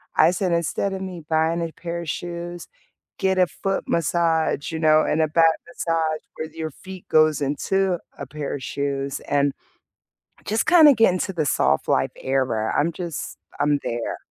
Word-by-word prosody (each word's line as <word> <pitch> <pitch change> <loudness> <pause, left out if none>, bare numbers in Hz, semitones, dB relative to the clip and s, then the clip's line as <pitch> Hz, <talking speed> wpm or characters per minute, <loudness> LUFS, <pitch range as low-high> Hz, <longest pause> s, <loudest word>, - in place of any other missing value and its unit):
I 160 +3 +5
said, 180 0 -1
instead 170 +4 -1
of 190 - -5
me 180 -4 -6
buying 160 +1 +1
a 165 -1 -3
pair 170 0 -5
of 165 - -6
shoes, 175 +1 -5 0.5
get 190 -1 +1
a 180 - +5
foot 195 +3 -3
massage, 165 -2 +1
you 160 - -3
know, 155 -1 +5
and 160 - +1
a 155 - +3
back 165 +1 +4
massage 165 -2 -1 0.2
where 160 0 -5
your 160 -1 -5
feet 185 +4 -11
goes 155 -1 +4
into 180 +6 0 0.2
a - - -6
pair 150 -2 -5
of 130 - -7
shoes 140 -1 -3
and, 140 -1 +1 0.9
just 220 +2 0
kind 340 -4 +8
of 280 - +5
get 225 -4 +5
into 190 +1 -2
the 160 -4 -1
soft - - +1
life - - +1
era. 130 -5 -1
I'm 165 +3 +2
just, 170 -2 -6 0.2
I'm 145 0 +2
there. 120 0 -3
165 Hz, 180 wpm, -23 LUFS, 150-175 Hz, 0.9 s, kind